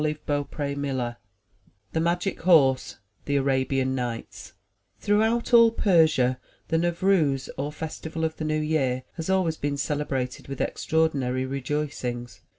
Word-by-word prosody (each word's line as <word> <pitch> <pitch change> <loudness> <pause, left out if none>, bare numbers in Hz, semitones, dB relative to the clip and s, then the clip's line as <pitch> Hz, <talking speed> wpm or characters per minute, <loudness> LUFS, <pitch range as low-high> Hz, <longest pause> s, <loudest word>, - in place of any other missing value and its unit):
MY 155 0 0
BOOK 145 -1 -1
HOUSE 140 -4 -2 0.8
THE 160 - +1
MAGIC 175 +3 0
HORSE 145 -7 +4 0.3
The 145 - 0
Arabian 135 -1 +1
Nights 120 -3 -5 0.5
HROUGHOUT 220 +4 +1
all 230 -1 +8
Persia 160 - +3 0.3
the 165 - +2
Nevrouz, 170 -5 +1
or 140 +2 -3
Festi 160 +1 -6
val 160 0 -4
of 160 0 -1
the - - -4
New 155 0 0
Year, 135 -5 0
has 165 +2 -4
always 185 -4 +1
been 145 0 -2
celebrated 135 -3 -2
with 135 -1 -6
extraordinary 135 -5 0
rejoicings. 130 -4 -4
145 Hz, 135 wpm, -26 LUFS, 130-160 Hz, 0.8 s, all